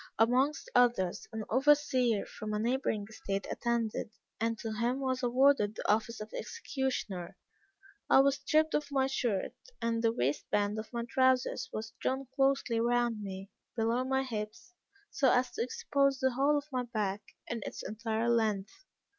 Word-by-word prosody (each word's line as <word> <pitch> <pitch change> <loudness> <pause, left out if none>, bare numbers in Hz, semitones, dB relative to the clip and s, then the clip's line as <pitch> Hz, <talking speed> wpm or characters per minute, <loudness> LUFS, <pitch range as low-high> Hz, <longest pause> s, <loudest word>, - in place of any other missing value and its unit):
Amongst 255 +7 +2
others, 235 -8 +2
an 220 -1 -4
overseer 260 -4 +3
from 215 0 -6
a 210 - 0
neighboring 230 -3 0
estate 200 -2 -4
attended; 235 -2 -1 0.3
and 230 0 0
to 225 - -5
him 240 +4 0
was 260 -1 -1
awarded 245 -3 +3
the - - -5
office 220 +2 +1
of 215 +1 -8
executioner. 260 - -4 0.7
I 265 - +7
was 275 0 +3
stripped 310 +2 +2
of 295 -1 0
my 270 -1 +2
shirt, 240 -7 -1 0.3
and 230 0 0
the 230 -1 +3
waist 140 - -1
band 205 +1 +1
of 215 - -8
my 235 -1 -2
trousers 260 0 +2
was 220 +1 -5
drawn 265 +1 -1
closely 270 -4 +2
round 240 -1 +1
me, 195 0 -7 0.2
below 230 +2 +1
my 265 +1 +1
hips, 220 +5 -6 0.4
so 265 -3 +3
as 250 0 +2
to - - -4
expose 275 +2 +1
the 260 0 +1
whole 280 +4 +2
of 290 0 -4
my 255 -1 0
back, 210 -4 -2 0.2
in 230 -1 -4
its - - -6
entire 225 +1 -2
length. 215 -4 +1
235 Hz, 165 wpm, -31 LUFS, 215-265 Hz, 0.7 s, I